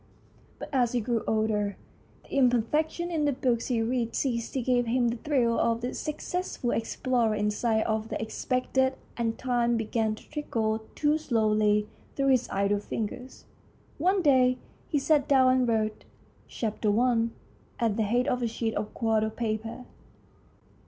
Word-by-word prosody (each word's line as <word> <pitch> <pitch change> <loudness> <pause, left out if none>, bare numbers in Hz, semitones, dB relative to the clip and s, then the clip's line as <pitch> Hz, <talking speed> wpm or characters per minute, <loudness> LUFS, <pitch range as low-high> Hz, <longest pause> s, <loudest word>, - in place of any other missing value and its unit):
But - - -8
as 245 -3 +2
he 245 - +2
grew 235 0 -1
older 215 -2 0 0.5
the - - -14
imperfections 300 +7 +1
in 305 -2 +1
the 290 - +3
books 245 -3 0
he 235 -3 +1
read 235 0 -1
ceased 235 -4 -1
to 265 - 0
give 245 -1 +2
him 240 0 +2
the 235 - -3
thrill 240 -4 +1
of 230 0 +1
the 245 +1 -3
successful 305 -4 -3
explorer 230 -1 0
in 210 0 0
sight 220 0 +1
of 220 0 -1
the - - -3
ex 220 0 -5
pected, 260 +1 +1 0.2
and 230 -1 -1
time 240 -2 +1
began 220 -1 0
to - - -16
trickle 225 -8 -1 0.2
too 300 +1 +2
slowly 215 -5 +2 0.3
through 275 -1 +1
his 255 -2 +2
idle 200 +1 +1
fingers. 230 +5 -6 0.5
One 370 +4 +2
day 255 -3 +4 0.3
he 300 - 0
sat 290 0 +2
down 260 -3 +5
and 255 -1 +2
wrote 215 -2 0 0.3
" - - -32
Chapter 215 -1 -2
I. 240 -2 +3 0.2
" - - -31
at 225 -3 +1
the 225 - 0
head 240 +5 +1
of 250 -3 0
a 240 - +1
sheet 225 0 -2
of 210 0 -4
quarto 220 -1 +1
paper. 225 +2 -4
235 Hz, 170 wpm, -28 LUFS, 220-260 Hz, 0.5 s, down